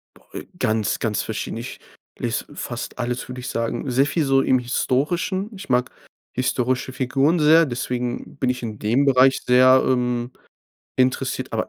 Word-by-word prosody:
Boah - - -22
ey, - - -7
ganz, 110 -3 0
ganz 105 -3 -1
verschieden. 110 0 -4
Ich 120 +3 -7 0.4
lese - - -2
fast - - -6
alles, 120 +1 -3
würde 125 0 -7
ich 130 - -5
sagen. 115 +3 -2
Sehr 135 +3 +3
viel 155 +2 0
so 135 -1 +3
im 130 - +3
Historischen. 155 - -1
Ich 195 - -10
mag 125 0 +1 0.4
historische 125 0 -1
Figuren 135 +6 +1
sehr, 160 +2 +6
deswegen 125 0 -4
bin 130 - 0
ich 125 -1 -2
in 110 -2 -5
dem 120 +7 +2
Bereich 135 0 +4
sehr, 130 +1 +6
ähm, 125 -1 0 0.7
interessiert. 130 0 0
Aber 110 - -2
125 Hz, 165 wpm, -22 LUFS, 120-135 Hz, 0.7 s, sehr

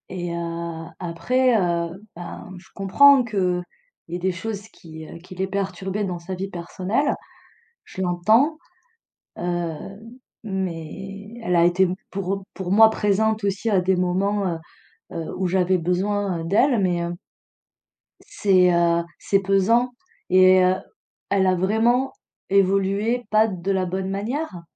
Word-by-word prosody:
Et 175 -2 -4
heu, 170 -1 -4
après, 245 +9 +1
heu, 170 +1 -2
bah, 175 0 -8
je 180 - -15
comprends 265 +8 +6
qu'il 185 -6 -1 0.5
y 170 - -4
ait - - -3
des 185 +1 0
choses 200 +3 -5
qui, 160 -5 -12
heu, - - -10
qui 180 +2 -13
l'ait 190 +1 -2
perturbée 195 +1 -3
dans 180 -3 -3
sa 180 +2 -6
vie 195 +2 -4
personnelle. 185 - -1 0.7
Je 190 - -6
l'entends, 215 - +3 0.8
heu, 175 -2 -2 0.7
mais 195 +1 -5
elle 180 -4 0
a 170 0 +5
été 180 +2 +3 0.2
pour 195 0 -3
pour 185 -2 -4
moi 220 +2 +7
présente 220 0 +1
aussi 200 +3 -1
à 195 -4 +3
des 185 +1 +2
moments, 190 +3 0
heu 170 -2 -2 0.6
heu, 165 - -4
où 185 0 0
j'avais 185 0 +2
besoin 180 +1 -1
d'elle, 235 +7 +3
mais 175 -2 +1
heu 170 0 -3 1.0
c'est, 185 -3 +3
heu, 170 0 +3 0.2
c'est 195 - +2
pesant 195 +6 +2 0.4
et 185 0 +6
heu, 185 +1 +3 0.5
elle 195 -1 +2
a 185 - +3
vraiment 225 +8 +1 0.4
évolué 195 +5 +2
pas 215 +1 +5
de 190 -2 -3
la 190 -1 +1
bonne 190 +1 -3
manière. 210 - -3
190 Hz, 145 wpm, -23 LUFS, 175-205 Hz, 1.0 s, moi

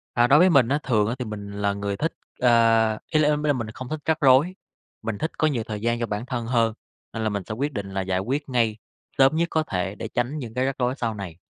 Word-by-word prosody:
À, 120 0 +5
đối 140 +4 +6
với 185 +3 +6
mình 135 -7 +5
á, 145 +3 +2
thường 110 -5 +2
á, 115 - -1
thì 125 - -3
mình 105 -2 -7
là 100 0 0
người 100 0 -3
thích, 165 +7 -1 0.3
ơ 125 - +4 0.6
ý 155 - +3
l - - +4
ý 150 - +4 0.2
là 145 - +4
mình 115 -5 -4
không 130 +2 -8
thích 155 +1 -4
rắc 160 -1 0
rối. 140 +6 +5 0.5
Mình 110 -2 -3
thích 160 - -2
có 155 - +3
nhiều 135 -7 0
thời 105 -1 -5
gian 120 +1 0
cho 115 - 0
bản 105 +3 -4
thân 125 -3 -3
hơn 115 -2 +2 0.4
nên 115 - -4
là 110 - +2
mình 100 -2 -2
sẽ 110 - -5
quyết 140 +6 -2
định 100 -5 -5
là 95 - 0
giải 95 -1 -1
quyết 140 +8 -2
ngay, 115 -4 +1 0.4
sớm 135 +3 +5
nhất 170 +1 +1
có 160 - +1
thể 95 -7 -3
để 110 - -6
tránh 120 +6 -2
những 120 -6 -7
cái 130 +1 0
rắc 135 0 -2
rối 125 0 +1
sau 115 -4 -2
này. 95 -5 -7
120 Hz, 280 wpm, -24 LUFS, 105-140 Hz, 0.6 s, đối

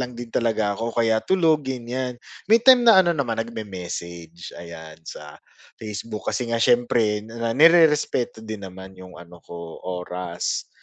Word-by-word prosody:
lang 125 -1 -4
din 120 0 -8
talaga 110 -4 0
ako 115 0 -4
o - - -18
kaya 110 -1 +2
tulog, 160 -6 +2
ganyan. 125 0 -4 0.3
May 225 +2 +6
time 245 0 +6
na 220 -5 +8
ano 175 -2 +2
naman, 120 -6 -1
nag-me-message 90 -6 -7
ayan, 80 -2 -11
sa 75 0 -10 0.4
Facebook 105 0 -6
kasi 125 -2 -2
nga 115 - 0
siyempre 115 -3 +2
na 115 +1 -4
nirerespeto 150 -8 +4
din 110 -2 -7
naman 95 +1 -12
yung 90 -1 -12
ano 85 0 -14
ko, 85 -1 -10
oras, 90 -1 -4
115 Hz, 155 wpm, -23 LUFS, 90-125 Hz, 0.4 s, na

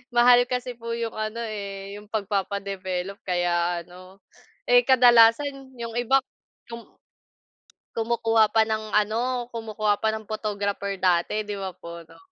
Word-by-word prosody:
Mahal 245 0 +6
kasi 250 -1 -3
po 230 0 -4
'yong 230 -1 -3
ano, 215 +1 -4
eh, 200 -2 -6
'yong 210 0 -13
pagpapa-develop, 200 -2 -3
kaya 175 -1 0
ano 185 +2 -16 0.4
Eh, 245 0 +5
kadalasan, 260 +2 +4
'yong 230 -1 -6
iba 265 +3 +3 0.5
yong 235 0 -9 1.1
kumukuha 225 -1 +2
pa 220 0 +3
ng 215 -1 -3
ano, 235 +4 0
kumukuha 215 -2 -1
pa 220 - +2
ng 220 -1 -6
photographer 205 -2 -3
dati, 185 +4 +1
'di 205 - -4
ba, 195 -1 -4
po, 170 0 -9
'no. 160 - -19
215 Hz, 135 wpm, -25 LUFS, 195-235 Hz, 1.1 s, Mahal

